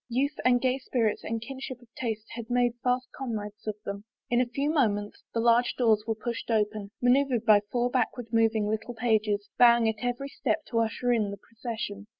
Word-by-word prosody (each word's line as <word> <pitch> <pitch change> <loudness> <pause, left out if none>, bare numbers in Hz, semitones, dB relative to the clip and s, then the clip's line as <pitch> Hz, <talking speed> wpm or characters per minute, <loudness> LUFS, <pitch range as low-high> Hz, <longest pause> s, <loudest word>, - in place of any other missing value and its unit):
Youth 275 +5 0
and 245 -1 +4
gay 255 +1 +1
spirits 230 -5 0
and 230 - -2
a 225 - -9
kinship 265 -1 -6
of 245 - -19
tastes 225 -3 -4
had 230 -1 -7
made 245 -1 +2
fast 250 0 +1
comrades 215 -5 -5
of 215 - -1
them. 200 0 -5 0.3
In 240 0 +4
a 250 - 0
few 280 +5 -1
moments 210 -9 0
the 230 - -1
large 235 +1 +3
doors 220 -4 +3
were 225 - 0
pushed 235 +2 -5
open, 210 -2 0
maneuvered 250 -1 +3
by 210 -1 +7
four 245 0 +1
backward 245 -2 -1
moving 225 -2 +3
little 220 +3 -3
pages, 215 -3 +1
bow 235 -1 +8
ing 230 -1 +1
at 220 +1 -2
every 245 +3 -2
step 315 +2 -1
to 230 - +2
usher 235 +2 +1
in 215 -3 +1
the 200 - -6
procession. 220 -3 -6
230 Hz, 205 wpm, -28 LUFS, 215-245 Hz, 0.3 s, bow